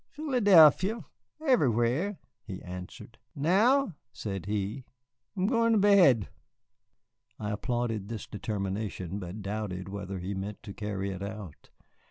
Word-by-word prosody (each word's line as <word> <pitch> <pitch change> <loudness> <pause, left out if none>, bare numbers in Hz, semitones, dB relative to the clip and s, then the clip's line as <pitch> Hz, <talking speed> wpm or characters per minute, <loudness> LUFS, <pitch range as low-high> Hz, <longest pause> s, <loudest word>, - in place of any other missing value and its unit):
Philadelphia... 210 - +5 0.4
everywhere," 150 - +2 0.3
he 95 -3 -7
answered. 90 0 -9 0.2
"Now," 205 - +3 0.2
said 95 -6 -5
he, 105 +5 -2 0.5
"'mgoin' 230 +4 +2
t' - - +4
bed." 185 - +5 1.1
I 105 -1 -3
applauded 115 -2 -2
this 115 -3 -5
determination, 100 -2 -4
but 95 +2 -7
doubted 100 -2 -4
whether 100 -1 -5
he 95 +2 -4
meant 100 +2 -6
to 100 - -8
carry 100 -2 -3
it 95 0 -6
out. 100 -6 -8
110 Hz, 115 wpm, -29 LUFS, -, 1.1 s, Philadelphia